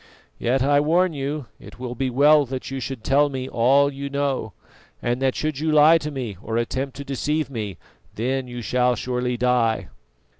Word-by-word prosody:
Yet 130 +2 +1
I 145 +1 +4
warn 170 +4 +2
you 140 0 -3
it 100 +2 -13
will 125 -1 -5
be 130 +2 -1
well 145 +4 +5
that 130 +1 -5
you 135 - -3
should 130 -2 -5
tell 145 +2 +3
me 130 -2 -4
all 140 +4 +3
you 140 +1 -5
know, 140 -6 -2 0.5
and 120 +2 -2
that 135 -1 +1
should 155 -3 -2
you 155 +1 0
lie 155 +2 +6
to 150 - -4
me 125 -9 -5
or 115 -1 -3
attempt 130 +3 -2
to 140 - -5
deceive 150 +2 -2
me, 105 -7 -5 0.4
then 130 +4 -1
you 120 -1 -7
shall 125 +3 +2
surely 125 +1 -2
die." 115 -7 +1
130 Hz, 190 wpm, -23 LUFS, 120-145 Hz, 0.5 s, lie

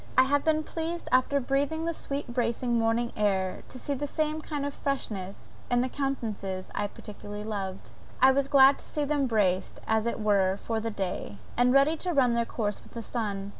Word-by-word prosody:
I 260 - +8
have 285 +2 +2
been 310 -1 +2
pleased 330 +2 -4
after 255 +2 +3
breathing 280 +5 0
the 335 - 0
sweet 285 -2 -4
bracing 235 0 +1
morning 230 +1 +1
air, 190 -3 0
to - - -9
see 285 +3 -3
the 285 +2 -3
same 310 +1 -1
kind 290 -2 -3
of 285 - -3
freshness 205 -10 -4 0.2
in 245 0 +3
the 255 - 0
countenances 215 -9 -3
I 205 - 0
particularly 205 0 -8
loved; 195 -3 -5 0.3
I 260 +1 +7
was 275 +1 +1
glad 275 0 +6
to - - -16
see 300 -1 -2
them 285 -2 +1
braced, 190 -5 +1
as 220 +1 +1
it 235 - -2
were, 200 -3 +2
for 225 +2 -2
the 225 +1 -2
day, 190 - -4 0.2
and 245 +1 +4
ready 275 +4 +5
to 355 +2 -2
run 255 -5 +4
their 235 0 +1
course 210 -3 -3
with - - -18
the 230 - -5
sun. 205 -4 -3
245 Hz, 205 wpm, -28 LUFS, 210-280 Hz, 0.3 s, I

